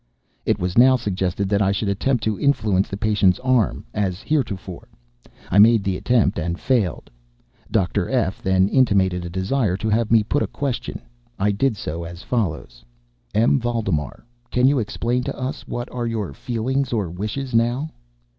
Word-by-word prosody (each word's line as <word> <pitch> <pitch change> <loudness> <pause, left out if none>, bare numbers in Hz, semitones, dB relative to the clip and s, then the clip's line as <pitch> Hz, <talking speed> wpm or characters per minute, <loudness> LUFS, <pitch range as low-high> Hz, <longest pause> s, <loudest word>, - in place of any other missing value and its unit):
It - - +2
was 90 +4 0
now 130 +1 +7
suggested 95 -4 -2
that 100 0 +2
I 100 -1 +3
should 100 +1 -1
attempt 115 +6 0
to 110 -2 -1
influence 105 -9 +2
the 100 - -5
patient's 105 -3 +2
arm, 130 -4 +1
as 95 -3 -2
heretofore. 100 - -2 0.6
I 100 - +4
made 110 0 +6
the 95 -2 -1
attempt 110 -3 +1
and 85 +1 -3
failed. 115 - -1 0.6
Dr. 95 0 0
F—— 120 -8 0
then 95 0 +3
intimated 95 -8 +2
a - - -5
desire 95 +3 0
to 110 +2 -2
have 110 +1 +1
me 110 -2 +5
put 145 +7 0
a - - 0
question. 135 -4 -4 0.3
I 105 +2 +2
did 110 +3 0
so, 85 0 -5
as 85 +1 -9
follows: 75 - -3 0.5
"M. 115 +5 +4
Valdemar, 110 - -2 0.2
can 125 +1 +3
you 140 -1 +3
explain 120 +3 -1
to - - -4
us 130 0 -5
what 120 0 -4
are 120 -1 -3
your 110 -5 -3
feelings 130 +2 -2
or 105 -6 0
wishes 110 +9 -4
now?" 120 +7 +1
105 Hz, 170 wpm, -22 LUFS, 95-125 Hz, 0.6 s, now